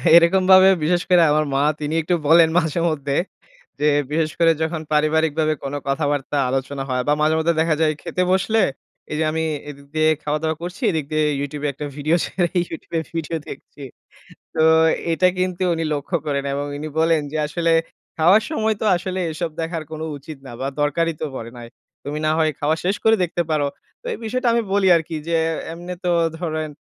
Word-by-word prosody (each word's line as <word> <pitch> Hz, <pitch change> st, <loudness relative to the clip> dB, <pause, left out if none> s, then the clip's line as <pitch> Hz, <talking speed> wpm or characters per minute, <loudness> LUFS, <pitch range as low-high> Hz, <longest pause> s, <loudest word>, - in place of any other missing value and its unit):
এরকমভাবে 185 Hz, +2 st, +6 dB
বিশেষ 175 Hz, +3 st, +2 dB
করে 180 Hz, -1 st, +6 dB
আমার 155 Hz, +1 st, +2 dB
মা 135 Hz, -, +2 dB, 0.2 s
তিনি 150 Hz, 0 st, -3 dB
একটু 175 Hz, +3 st, 0 dB
বলেন 165 Hz, +1 st, +6 dB
মাঝে 160 Hz, -1 st, +1 dB
মধ্যে। 140 Hz, -3 st, -2 dB, 0.6 s
যে 150 Hz, -, +2 dB, 0.2 s
বিশেষ 155 Hz, 0 st, 0 dB
করে 165 Hz, -1 st, +5 dB
যখন 160 Hz, 0 st, -1 dB
পারিবারিকভাবে 155 Hz, 0 st, +2 dB
কোন 140 Hz, +1 st, -4 dB
কথাবার্তা 145 Hz, 0 st, -1 dB
আলোচনা 135 Hz, +1 st, -2 dB
হয়। 125 Hz, -1 st, 0 dB
বা 145 Hz, -, +4 dB
মাঝে 155 Hz, +1 st, +3 dB
মধ্যে 165 Hz, +1 st, +2 dB
দেখা 160 Hz, -1 st, +2 dB
যায় 155 Hz, -1 st, +3 dB
খেতে 180 Hz, +1 st, -1 dB
বসলে, 195 Hz, +4 st, +2 dB, 0.5 s
এই -, -, -2 dB
যে 160 Hz, -, +2 dB
আমি 160 Hz, +1 st, -1 dB, 0.3 s
এদিক 140 Hz, -1 st, -11 dB
দিয়ে 155 Hz, 0 st, +3 dB
খাওয়া 150 Hz, +1 st, -1 dB
দাওয়া 160 Hz, 0 st, 0 dB
করছি, 180 Hz, +3 st, -7 dB
এদিক 155 Hz, -3 st, -2 dB
দিয়ে 155 Hz, 0 st, +2 dB, 0.2 s
YouTube 145 Hz, +1 st, -5 dB
এ -, -, +1 dB
একটা 145 Hz, +2 st, -6 dB
ভিডিও 155 Hz, +3 st, +1 dB
ছেড়ে 175 Hz, -2 st, -1 dB, 0.2 s
YouTube 165 Hz, -, -9 dB
এ -, -, -2 dB
ভিডিও 165 Hz, 0 st, -2 dB
দেখছি। 140 Hz, +1 st, -10 dB, 0.7 s
তো 160 Hz, -, +3 dB, 0.5 s
এইটা 185 Hz, +3 st, +3 dB
কিন্তু 185 Hz, 0 st, -1 dB
উনি 165 Hz, -, -2 dB
লক্ষ্য 145 Hz, +4 st, -3 dB
করেন 140 Hz, -1 st, -1 dB
এবং 140 Hz, +1 st, -2 dB
উনি 155 Hz, +2 st, -5 dB
বলেন 165 Hz, -1 st, +3 dB
যে 155 Hz, -, -3 dB
আসলে, 165 Hz, +2 st, 0 dB, 0.5 s
"খাওয়ার 180 Hz, +7 st, +5 dB
সময় 220 Hz, -8 st, 0 dB
তো -, -, 0 dB
আসলে 185 Hz, +1 st, -4 dB
এসব 165 Hz, +1 st, -3 dB
দেখার 165 Hz, -1 st, -3 dB
কোন 155 Hz, 0 st, -6 dB, 0.2 s
উচিত 145 Hz, +1 st, -10 dB
না -, -, -9 dB
বা 135 Hz, -, -1 dB
দরকারই 165 Hz, +3 st, +1 dB
তো -, -, 0 dB
পড়ে 115 Hz, -1 st, -7 dB
নাই। 120 Hz, -1 st, -9 dB, 0.4 s
তুমি 145 Hz, +2 st, -4 dB
না 155 Hz, -, +3 dB
হয় 155 Hz, -1 st, +2 dB
খাওয়া 150 Hz, +2 st, +1 dB
শেষ 190 Hz, +3 st, +1 dB
করে 220 Hz, 0 st, +6 dB
দেখতে 175 Hz, 0 st, -1 dB
পারো।" 150 Hz, -2 st, +1 dB, 0.3 s
তো -, -, -24 dB
এই -, -, -6 dB
বিষয়টা 250 Hz, +3 st, -1 dB
আমি 235 Hz, -, +2 dB
বলি 200 Hz, -2 st, +3 dB
আরকি 160 Hz, 0 st, -5 dB
যে, 170 Hz, -, +1 dB, 0.4 s
"এমনে 175 Hz, +2 st, -7 dB
তো 175 Hz, -, +2 dB, 0.3 s
ধরেন 155 Hz, -3 st, -3 dB
160 Hz, 195 wpm, -21 LUFS, 150-175 Hz, 0.7 s, এরকমভাবে